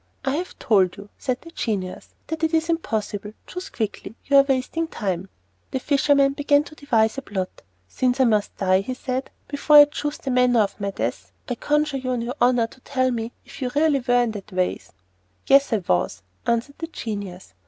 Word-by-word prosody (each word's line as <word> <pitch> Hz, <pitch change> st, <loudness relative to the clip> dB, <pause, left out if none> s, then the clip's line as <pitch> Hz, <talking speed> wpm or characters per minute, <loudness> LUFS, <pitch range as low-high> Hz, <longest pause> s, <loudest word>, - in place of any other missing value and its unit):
"I 270 Hz, -, +2 dB
have 360 Hz, +2 st, -5 dB
told 190 Hz, -5 st, +2 dB
you," 200 Hz, +1 st, -11 dB
said 255 Hz, -1 st, -2 dB
the 330 Hz, -, -12 dB
genius, 200 Hz, -, -4 dB
"that 320 Hz, 0 st, -5 dB
it 320 Hz, 0 st, +2 dB
is 325 Hz, +1 st, +1 dB
impossible. 215 Hz, -10 st, -2 dB
Choose 365 Hz, 0 st, -7 dB
quickly; 220 Hz, 0 st, -4 dB
you 280 Hz, -, +2 dB
are -, -, +10 dB
wasting 275 Hz, +4 st, -1 dB
time." 190 Hz, -, -3 dB, 0.4 s
The 265 Hz, -, -2 dB
fisherman 280 Hz, 0 st, +3 dB
began 290 Hz, 0 st, +3 dB
to 305 Hz, -, -13 dB
devise 245 Hz, -5 st, +1 dB
a -, -, -8 dB
plot. 190 Hz, -7 st, -5 dB, 0.3 s
"Since 250 Hz, -, 0 dB
I -, -, +6 dB
must 215 Hz, -4 st, +1 dB
die," 190 Hz, -1 st, +3 dB
he 255 Hz, +6 st, -4 dB
said, 255 Hz, +1 st, -3 dB, 0.2 s
"before 295 Hz, +1 st, +2 dB
I 295 Hz, 0 st, +12 dB
choose 295 Hz, +1 st, -4 dB
the 270 Hz, -, -4 dB
manner 250 Hz, -2 st, +4 dB
of 205 Hz, 0 st, -2 dB
my 200 Hz, -, 0 dB
death, 105 Hz, -, -4 dB, 0.2 s
I -, -, -1 dB
conjure 295 Hz, +3 st, 0 dB
you 255 Hz, -1 st, -4 dB
on 245 Hz, -2 st, -1 dB
your 240 Hz, +1 st, -3 dB
honour 245 Hz, -1 st, +4 dB
to 230 Hz, -, -13 dB
tell 255 Hz, -1 st, 0 dB
me 230 Hz, -1 st, -3 dB
if -, -, -12 dB
you 255 Hz, -, 0 dB
really 295 Hz, -1 st, +3 dB
were 245 Hz, -1 st, +3 dB
in 235 Hz, -, -1 dB
that 205 Hz, -3 st, -8 dB
vase?" 185 Hz, -2 st, -2 dB, 0.5 s
"Yes, 275 Hz, 0 st, +5 dB
I 225 Hz, -, +3 dB
was," 90 Hz, +2 st, 0 dB, 0.2 s
answered 235 Hz, +5 st, -1 dB
the 330 Hz, -, -4 dB
genius. 200 Hz, -, -6 dB
250 Hz, 205 wpm, -23 LUFS, 210-285 Hz, 0.5 s, I